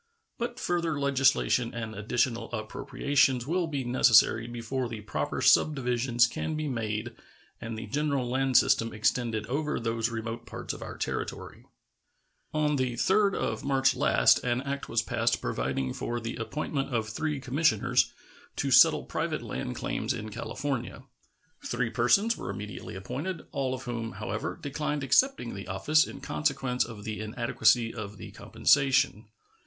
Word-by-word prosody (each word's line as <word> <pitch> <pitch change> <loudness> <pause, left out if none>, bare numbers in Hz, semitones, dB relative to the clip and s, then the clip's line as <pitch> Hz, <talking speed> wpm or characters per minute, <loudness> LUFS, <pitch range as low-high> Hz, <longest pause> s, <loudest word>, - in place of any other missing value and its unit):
But 240 +1 -3
further 170 - -1
legislation 135 -3 +2
and 115 -2 -4
additional 115 +3 -1
appropriations 125 +3 0
will 170 +3 0
be 140 -4 -3
necessary 115 -2 +4
before 120 +1 -3
the 110 -2 -6
proper 75 -8 -3
subdivisions 125 -4 +3
can 155 - -3
be 155 0 -2
made 115 -2 -3 0.5
and 115 0 -5
the 110 - -5
general 140 +2 -1
land 130 +1 +2
system 115 0 +3
extended 110 0 0
over 150 +5 -2
those 115 0 -1
remote 115 +1 -5
parts - - -5
of - - -10
our - - -7
territory. - - -5 0.8
On 150 -1 +1
the 130 -2 0
3d 195 - +2
of 110 - -2
March 135 -1 +2
last - - +4
an 125 +1 0
act 140 0 -4
was - - +1
passed - - 0
providing 65 +2 -2
for 120 0 -3
the 115 0 -5
appointment 135 +3 -3
of 115 -3 0
three 150 +5 -2
commissioners 130 -4 +2 0.4
to - - -1
settle - - +7
private - - -3
land 60 - -4
claims - - -2
in 110 +1 -6
California. 125 +3 -4 0.6
Three 120 -1 -1
persons 135 - +3
were 95 - -6
immediately 105 +2 -6
appointed, 140 - -5
all 135 -2 -1
of 130 - -9
whom, 115 -3 -4
however, - - -4
declined 145 0 -3
accepting 140 - +2
the 100 -1 -7
office 150 +12 +3
in - - -9
consequence 135 -4 0
of 110 -3 -9
the 110 -1 -4
inadequacy 115 +1 +2
of 105 -2 -7
the - - -9
compensation. 135 -6 +2
125 Hz, 150 wpm, -28 LUFS, 115-140 Hz, 0.8 s, settle